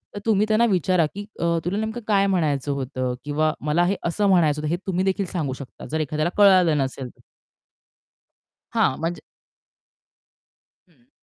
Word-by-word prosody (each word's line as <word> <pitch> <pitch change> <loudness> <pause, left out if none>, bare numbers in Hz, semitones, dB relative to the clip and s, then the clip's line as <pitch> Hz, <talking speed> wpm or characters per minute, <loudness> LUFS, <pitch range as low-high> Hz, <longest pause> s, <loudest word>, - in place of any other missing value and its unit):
तर 205 - -4
तुम्ही 215 -2 +3
त्यांना 220 +2 +3
विचारा 185 -5 +2
की 205 +1 -6
अ, - - -2 0.2
"तुला 185 +4 -1
नेमकं 220 +2 -3
काय 200 -2 +3
म्हणायचं 150 -7 0
होतं?" 130 -2 -3
किंवा 155 +1 0
"मला 155 +3 +2
हे 195 +2 +1
असं 200 +4 +1
म्हणायचं 155 -5 +3
होतं." 150 - -2
हे 175 - 0
तुम्ही 185 0 0
देखील 190 +1 0
सांगू 155 -7 -3
शकता 135 -2 -11
जर 160 - -1
एखाद्याला 155 +2 -1
कळालं 185 -6 +5
नसेल 130 -2 -3
तर. - - -23 1.5
हां, 130 - +2
म्हणजे 165 +2 -3 1.7
हं. 130 -9 -31
170 Hz, 160 wpm, -23 LUFS, 145-195 Hz, 1.7 s, कळालं